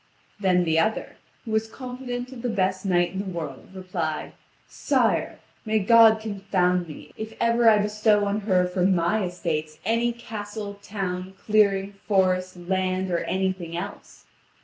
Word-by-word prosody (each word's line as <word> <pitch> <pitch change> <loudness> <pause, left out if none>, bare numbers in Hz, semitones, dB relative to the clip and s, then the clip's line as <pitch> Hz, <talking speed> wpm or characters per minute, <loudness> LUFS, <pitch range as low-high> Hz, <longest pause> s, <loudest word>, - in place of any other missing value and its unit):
Then 185 -3 +3
the 160 -1 +2
other, 215 +7 -1 0.3
who 225 - -5
was 220 0 +1
confident 250 0 -6
of 255 -3 -9
the 245 - -1
best 190 -2 0
knight 175 -2 +2
in 190 - -5
the 200 - -3
world, 165 -7 -6
replied: 180 -4 -4 0.3
"Sire, - - 0 0.3
may 220 -1 +1
God 220 +1 +6
confound 190 -4 0
me, 155 - -11
if 220 0 -6
ever 230 0 +4
I 215 - +6
bestow 210 0 +2
on 200 +1 0
her 185 -4 +2
from 180 +1 +2
my 175 +4 +1
estates 155 -4 -3
any 230 +2 +2
castle, 210 -3 -7
town, 190 -2 -4
clearing, 200 -2 +3
forest, 185 -2 +1
land, 185 +1 -1
or 170 - +1
anything 185 -3 -2
else. 200 +3 -8
195 Hz, 150 wpm, -25 LUFS, 180-220 Hz, 0.3 s, God